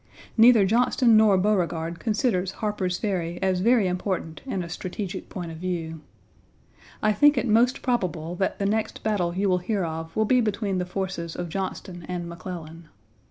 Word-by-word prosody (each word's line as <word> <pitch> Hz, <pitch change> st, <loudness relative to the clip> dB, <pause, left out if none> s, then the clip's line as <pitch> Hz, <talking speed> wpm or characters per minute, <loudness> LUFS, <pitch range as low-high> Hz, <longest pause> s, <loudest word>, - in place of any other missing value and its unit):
Neither 230 Hz, -3 st, +7 dB
Johnston 235 Hz, +2 st, +3 dB
nor 215 Hz, -3 st, +6 dB
Beauregard 175 Hz, -4 st, 0 dB
considers 205 Hz, -4 st, 0 dB
Harper's 200 Hz, -4 st, -2 dB
Ferry 175 Hz, -5 st, -2 dB
as 190 Hz, -1 st, +1 dB
very 225 Hz, 0 st, +3 dB
important 180 Hz, -3 st, -3 dB
in 195 Hz, -8 st, -2 dB
a -, -, -7 dB
strategic 185 Hz, +2 st, -5 dB
point 175 Hz, -3 st, -6 dB
of 160 Hz, -, -8 dB
view. 165 Hz, -3 st, -4 dB, 1.0 s
I 215 Hz, 0 st, +4 dB
think 290 Hz, +5 st, +5 dB
it 250 Hz, -, +1 dB
most 235 Hz, +3 st, +3 dB
probable 180 Hz, -, -1 dB
that 190 Hz, -, -1 dB
the 200 Hz, -, -2 dB
next 215 Hz, +2 st, -1 dB
battle 180 Hz, -6 st, 0 dB
you 200 Hz, +2 st, +1 dB
will 180 Hz, -1 st, +2 dB
hear 195 Hz, +2 st, -1 dB
of 160 Hz, 0 st, -6 dB
will 220 Hz, -, +2 dB
be 250 Hz, +3 st, +4 dB
between 205 Hz, -3 st, -1 dB
the 180 Hz, -, -2 dB
forces 180 Hz, -3 st, -4 dB
of 175 Hz, -1 st, -4 dB
Johnston 185 Hz, -1 st, -5 dB
and 175 Hz, -1 st, -3 dB
McClellan. 170 Hz, -2 st, -8 dB
190 Hz, 170 wpm, -25 LUFS, 175-215 Hz, 1.0 s, Neither